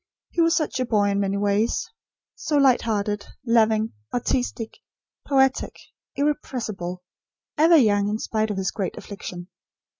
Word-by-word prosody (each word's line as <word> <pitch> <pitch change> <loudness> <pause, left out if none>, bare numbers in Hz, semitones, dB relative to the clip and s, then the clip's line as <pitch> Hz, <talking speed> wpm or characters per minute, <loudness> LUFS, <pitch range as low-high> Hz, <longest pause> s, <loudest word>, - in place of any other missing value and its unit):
He 345 - +1
was 330 0 +4
such 310 -5 -1
a 255 - +1
boy 205 -3 +2
in 200 - 0
many 200 0 0
ways; 205 - +1 0.5
so 300 - -1
light 270 -3 +5
hearted, 205 -2 -2 0.2
loving, 220 -2 +3 0.2
artistic, 245 -2 -2 0.5
poetic, 265 -1 +2 0.4
irrepressible; 230 -11 -2 0.5
ever 325 +2 +6
young, 205 -6 +3
in 210 - -1
spite 220 -1 -1
of 205 - -3
his 190 0 -1
great 195 -3 -4
affliction. 180 -3 -8
220 Hz, 140 wpm, -24 LUFS, 200-265 Hz, 0.5 s, ever